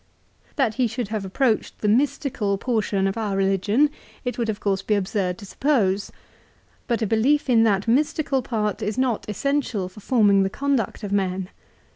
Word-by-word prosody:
That 260 -7 +1
he 245 - +4
should 230 -1 -4
have 215 -3 -3
approached 225 +3 0
the 210 - -2
mystical 230 -3 +1
portion 210 -4 0
of 195 +3 -1
our 210 -3 -1
religion 200 +9 +2 0.3
it 245 - -2
would 235 -2 -2
of 210 -1 -2
course 195 -2 0
be 210 +2 +1
absurd 185 -2 -1
to 200 - -10
suppose. 205 -5 0 0.8
But 235 -2 0
a - - +2
belief 245 +8 +2
in 230 -2 +5
that 200 -1 +1
mystical 290 +2 +1
part 215 -5 -2
is 210 +3 -2
not 250 -5 0
essential 245 -3 -1
for 185 - -14
forming 205 -3 +3
the 195 - +1
conduct 275 -2 -1
of 200 - -4
men. 190 -2 -1
215 Hz, 175 wpm, -23 LUFS, 195-255 Hz, 0.8 s, in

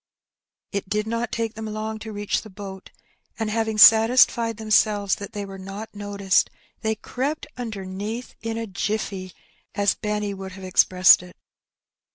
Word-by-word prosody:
It 200 -2 -4
did 210 +1 0
not 230 +1 -2
take 225 -1 -2
them 220 0 -6
long 215 +1 -4
to 220 0 -7
reach 205 -1 -1
the 215 - -12
boat; 195 -1 -9 0.5
and 220 -2 -2
having 220 -1 -1
satisfied 230 +1 +6
themselves 215 -2 +2
that 200 - -8
they 205 -1 -4
were 195 -1 -9
not 200 +3 -8
noticed, 200 -2 +1 0.3
they 220 0 0
crept 270 +7 -3
imdemeath 215 0 -5
in 225 0 -3
a 230 - -3
^^jilBTey," 195 -1 -3 0.4
as 205 -1 +2
Benny 210 -1 -2
would 190 -1 -8
have 190 0 -10
expressed 185 0 +5
it. 180 0 -14
210 Hz, 155 wpm, -24 LUFS, 195-225 Hz, 0.5 s, satisfied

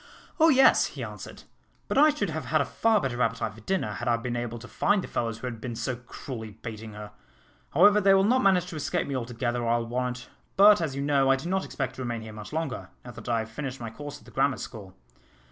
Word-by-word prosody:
"Oh, 325 +1 +7
yes!" 270 -3 +6
he - - -7
answered; - - -9 0.4
"but - - -2
I 300 +3 +7
should 205 - -1
have 160 0 -4
had 155 - +2
a - - +1
far 225 -2 +2
better 125 -5 -2
appetite 115 -2 0
for 110 - -14
dinner, 175 - -1
had 120 +5 -5
I 120 -1 +3
been 120 +1 -4
able 120 -1 -3
to 120 +1 -10
find 205 +7 +1
the - - -6
fellows 115 -2 -2
who 120 - -8
had 115 -3 -5
been 120 -2 -5
so 120 +2 -2
cruelly 120 -1 -8
baiting 110 -1 -7
her. 105 0 -9 0.6
However, 205 +6 +6
they 195 0 +6
will 195 - +4
not 250 +6 +3
manage 185 -5 +4
to - - -7
escape 150 - -1
me 140 - -3
altogether, 120 0 -2
I'll 115 0 +1
warrant; 125 +1 -3 0.3
but, 205 0 +7
as 145 -5 -2
you 140 - -2
know, 140 -2 +3
I 135 - +6
do 135 +5 -6
not 190 +1 0
expect 135 -2 -4
to - - -5
remain 120 -2 -3
here 110 -1 -9
much 105 -1 -9
longer, 155 -5 -3 0.2
now 120 - -7
that 120 - -9
I 115 - +2
have 110 0 -8
finished 135 +2 -5
my 115 -2 -6
course 145 +4 -8
at - - -20
the - - -14
Grammar 135 -2 +1
School. 100 -6 -9
125 Hz, 250 wpm, -27 LUFS, 115-160 Hz, 0.6 s, Oh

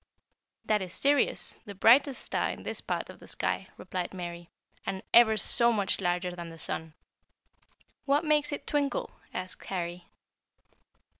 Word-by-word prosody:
"That 210 -1 +2
is 185 -2 -6
Sirius, 285 +1 +2
the 200 -2 -8
brightest 255 +7 +5
star - - 0
in - - -6
this - - -1
part - - -3
of - - -16
the - - -14
sky," 190 - -2
replied 185 0 -4
Mary, 175 -1 -6 0.3
"and 190 - -4
ever 220 -2 +7
so 235 +2 +3
much 205 -4 +1
larger 180 0 0
than 170 -1 -7
the 165 - -11
sun." 160 -1 -4 1.1
"What 290 +4 +2
makes 300 -1 +3
it 285 - -5
twinkle?" 285 -2 -1 0.2
asked 185 0 -5
Harry. 175 -1 -4
190 Hz, 150 wpm, -29 LUFS, 175-265 Hz, 1.1 s, ever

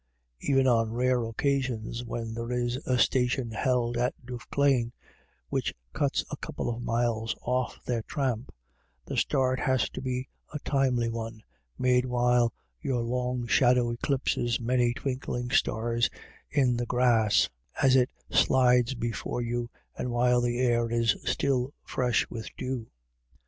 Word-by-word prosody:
Even 135 - +2
on 115 -3 +3
rare 125 +1 +1
occasions 120 -1 -1
when 115 -1 -4
there 115 +1 -4
is 120 0 0
a 130 - +2
station 125 -1 +2
held 120 0 0
at 125 +1 0
Duffclane, 125 0 0 0.6
which - - -1 0.2
cuts - - 0
a - - -4
couple - - -4
of 115 - -7
miles 115 -1 0
off 125 0 -1
their 120 -2 -1
tramp, 130 -2 -2 0.5
the - - -5
start 130 -1 +1
has 130 -3 +1
to - - -6
be 130 0 -2 0.2
a 150 - -3
timely 130 -4 +2
one, 115 -1 -5 0.3
made 125 0 +3
while 120 -1 +3 0.3
your 125 -3 0
long 125 0 -1
shadow 120 0 +4
eclipses 120 -1 0
many 120 0 +2
twinkling 125 -3 -3
stars 115 +1 +2 0.4
in 130 -5 +2
the 120 0 -2
grass 120 -4 +3 0.3
as 135 -1 +5
it 125 -1 +4 0.2
slides 125 -1 +4
before 120 +1 -3
you, 120 0 -2 0.3
and 125 - -3
while 125 0 +3
the 120 0 0
air 120 -2 +2
is 115 -1 +2
still 135 0 0
fresh 125 -2 +1
with 110 -2 -6
dew. 130 -3 -3
125 Hz, 140 wpm, -28 LUFS, 120-130 Hz, 0.6 s, as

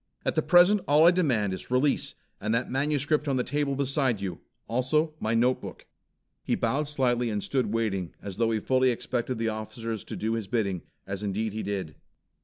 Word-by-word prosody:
At - - +1
the - - +2
present 180 +3 +5
all 150 +3 +6
I 170 - +8
demand 125 - +1
is 95 - -7
release 130 +3 +1 0.2
and 110 +3 0
that 120 - -1
manuscript 145 +2 +1
on 135 - +1
the 125 - +1
table 145 0 -1
beside 135 -4 +1
you. 95 -2 -4 0.3
Also 150 +6 +1
my 110 +1 0
notebook." 125 +3 0 0.6
He - - +1
bowed 145 +2 0
slightly 125 -4 +1
and 105 -2 -2
stood 125 -6 0
waiting 100 -6 -1
as 100 -3 -7
though 115 0 +2
he 110 -1 +1
fully 130 +3 +2
expected 125 0 -2
the 115 0 0
officers 110 0 -5
to - - -6
do 110 +1 -1
his 115 -3 -3
bidding, 100 -5 -1 0.2
as 100 0 -5
indeed 105 +1 -2
he 110 - -3
did. 95 -6 -3
120 Hz, 195 wpm, -27 LUFS, 110-140 Hz, 0.6 s, I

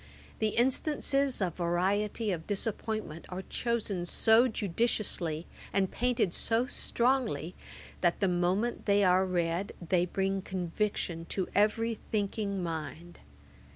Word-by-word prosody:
The 220 -1 0
instances 275 0 +2
of 175 -3 -2
variety 195 +5 0
of 165 -3 -4
disappointment 210 -4 -3
are 185 +1 -5
chosen 210 -8 -2
so 225 +6 +5
judiciously 195 -6 -1 0.3
and 195 -1 +1
painted 240 -7 +1
so 230 +2 +2
strongly, 235 - 0 0.5
that, 175 -2 +2
the 195 - +2
moment 185 +8 0
they 200 0 +4
are 185 0 +4
read, 175 +1 -1
they 180 0 +1
bring 195 +1 -1
conviction 180 -2 -2
to 185 +2 -2
every 220 +2 +2
thinking 200 -2 -1
mind. 165 +1 -5
195 Hz, 120 wpm, -30 LUFS, 175-225 Hz, 0.5 s, so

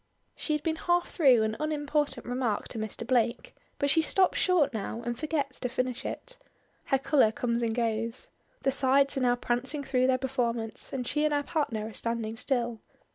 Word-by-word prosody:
She 310 - -1
had 300 - -1
been 320 -1 0
half 350 +1 +1
through 260 -8 +5
an 220 0 -1
unimportant 295 -3 -1
remark 245 -4 -1
to 225 - -5
Mr. 220 +1 -4
Blake, 235 -1 0 0.2
but 285 0 +1
she 325 - +4
stops 375 +4 +2
short 325 -8 +3
now 225 +2 -4
and 240 0 -1
forgets 285 -1 -2
to 250 - -2
finish 255 0 -2
it. - - -6 0.5
Her 270 - +2
color 265 -4 +3
comes 235 +1 -1
and 225 -1 0
goes. 230 0 -1 0.3
The 270 - +3
sides 275 +1 +3
are - - 0
now 245 -1 +3
prancing 245 +4 -2
through 255 -2 +2
their 260 -1 +3
performance, 240 -4 -2
and 255 -2 -3
she 295 +4 0
and 305 - +2
her 290 - +1
partner 260 -9 -1
are 220 - -9
standing 230 -1 -3
still. 240 -2 -1
255 Hz, 190 wpm, -29 LUFS, 235-290 Hz, 0.5 s, through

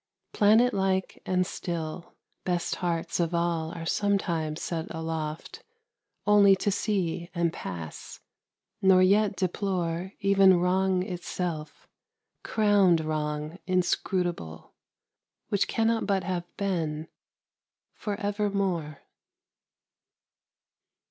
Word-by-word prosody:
Planet 220 +4 +5
like 190 -1 -1
and 185 -1 +2
still, 170 -1 -5 0.3
Best 175 -2 -1
hearts 170 -2 -2
of 170 0 0
all 170 -1 0
are 165 -1 -6
sometimes 165 -5 0
set 165 -1 -3
aloft 160 -1 -5 0.6
Only 205 -1 +6
to 200 +2 0
see 185 -4 -1
and 170 -1 +1
pass, 85 -4 -7 0.6
nor 190 -1 +6
yet 200 +1 +3
deplore 185 -1 -2
Even 195 -2 +5
Wrong 185 +1 +2
itself, 175 -4 -5 0.6
crowned 200 -6 +3
Wrong 150 +2 -3
inscrutable, 180 - -1 0.8
Which 200 - +1
cannot 225 0 +1
but 195 -3 +1
have 180 -2 -2
been, 165 -6 -2 0.9
for 205 -2 -4
evermore. 200 -7 -1
180 Hz, 95 wpm, -27 LUFS, 165-195 Hz, 0.9 s, Only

